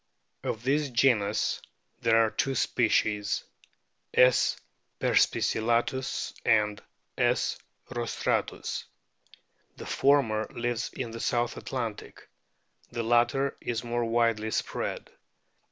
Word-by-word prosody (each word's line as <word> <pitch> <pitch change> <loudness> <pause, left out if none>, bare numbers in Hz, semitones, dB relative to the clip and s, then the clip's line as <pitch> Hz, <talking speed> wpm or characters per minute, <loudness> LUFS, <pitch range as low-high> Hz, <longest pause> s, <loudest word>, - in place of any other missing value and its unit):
Of 110 - -4
this 145 +2 +1
genus 115 -4 +2 0.4
there 115 -1 +4
are 110 - -2
two 135 -1 -1
species, 105 -4 +1 0.7
S. 125 0 +5 0.4
perspicillatus 120 +3 +1
and 105 -1 +2 0.4
S. - - +1 0.4
restrains. 120 -1 -2 0.9
The - - -8
former 125 -6 +2
lives 120 -1 -2
in 120 -3 -4
the 115 - -7
South 120 0 0
Atlantic; 115 -5 -5 0.6
the 120 - -2
latter 120 +4 +2
is 115 -1 -2
more 120 0 -1
widely 115 -2 +1
spread. - - -3
120 Hz, 95 wpm, -28 LUFS, 110-125 Hz, 0.9 s, S